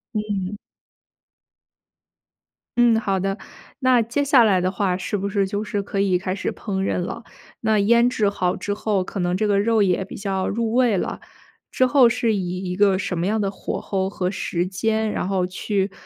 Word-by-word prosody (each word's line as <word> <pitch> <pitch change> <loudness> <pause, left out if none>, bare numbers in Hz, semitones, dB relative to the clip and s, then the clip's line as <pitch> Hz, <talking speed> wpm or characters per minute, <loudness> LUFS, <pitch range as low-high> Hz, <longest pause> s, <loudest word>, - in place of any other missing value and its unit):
嗯。 205 -2 -2 2.2
嗯， 235 -2 +5
好 195 -3 -1
的， 195 +2 -2 0.4
那 255 -2 +4
接 240 +6 -1
下 270 -4 +5
来 195 -4 +3
的 185 +1 0
话， 190 -2 0
是 200 - -3
不 200 0 -2
是 200 -1 +1
就 205 +2 -3
是 210 -2 -3
可 195 0 -3
以 190 -2 +2
开 185 0 -3
始 195 - -3
烹 195 -3 -4
饪 195 - 0
了？ 180 +6 -4 0.4
那 220 -1 +1
腌 235 +4 +4
制 210 -4 +1
好 180 -3 0
之 205 - -3
后， 205 -2 0
可 195 - -6
能 180 0 0
这 215 - 0
个 200 -1 +2
肉 220 0 +3
也 190 0 +1
比 195 - -10
较 195 -2 -2
入 225 +1 -1
味 240 -5 +3
了。 - - -3 0.5
之 255 - +2
后 255 -2 +5
是 230 -2 +1
以 185 -1 -3
一 - - -3
个 195 -1 +3
什 180 -2 -3
么 170 - -1
样 220 +2 +1
的 195 - 0
火 - - -5
候 190 -1 -2
和 185 -2 -2
时 175 -3 -2
间， 220 +4 -1
然 - - -2
后 190 -2 0
去 195 +2 -2
200 Hz, 215 characters per minute, -22 LUFS, 190-220 Hz, 2.2 s, 嗯